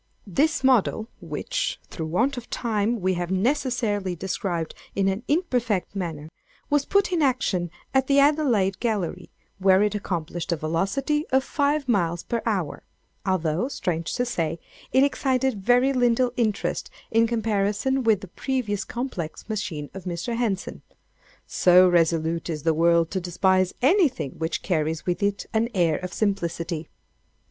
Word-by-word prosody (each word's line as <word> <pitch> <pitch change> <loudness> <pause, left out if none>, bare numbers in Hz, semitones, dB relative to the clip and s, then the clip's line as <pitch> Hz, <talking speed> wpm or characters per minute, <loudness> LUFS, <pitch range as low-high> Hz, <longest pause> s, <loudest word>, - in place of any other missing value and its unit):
"This 280 - +1
model 235 -3 +2
(which, - - -3
through 160 -2 -4
want 240 - +1
of 245 -1 -8
time, 220 -1 -1
we 185 +1 +2
have 175 -1 -3
necessarily 215 -3 0
described 175 -2 -3 0.2
in 195 -1 +2
an 195 +2 0
imperfect 245 - 0
manner,) 160 -5 -4 0.4
was 290 -1 +3
put 400 -1 +2
in 345 -3 +1
action 225 - +1 0.2
at 265 -1 +3
the 280 - +3
Adelaide 270 -10 +3
Gallery, 200 -6 -2 0.3
where 190 +1 +5
it 210 0 +1
accomplished 175 -4 -3
a - - +2
velocity 195 - -1
of 265 0 +2
five 285 0 0
miles 175 -7 +1
per 235 -1 -2
hour; 190 -9 -1 0.5
although, 175 +2 +1
strange 165 - -2
to 245 - 0
say, 170 -9 -2 0.3
it 260 - +5
excited 265 -5 +1
very 250 +5 +4
little 245 -1 +2
interest 215 -4 -1 0.2
in 230 +1 +4
comparison 225 +3 0
with 220 -4 +3
the 195 - -8
previous 215 0 -2
complex 235 -11 -5
machine 195 -9 -4
of 195 -1 -9
Mr. 180 +7 -3
Henson—so 185 -4 +1
resolute 165 -1 +1
is 155 -3 -3
the 165 - +3
world 170 +1 +3
to 190 - -1
despise 185 +1 +1
anything 275 - +3
which 160 +1 -2
carries 160 -2 -1
with 180 +2 -1
it 200 0 0
an 225 +1 +1
air 170 -4 +3
of 180 0 -6
simplicity. 170 -5 -2
200 Hz, 145 wpm, -25 LUFS, 175-250 Hz, 0.5 s, where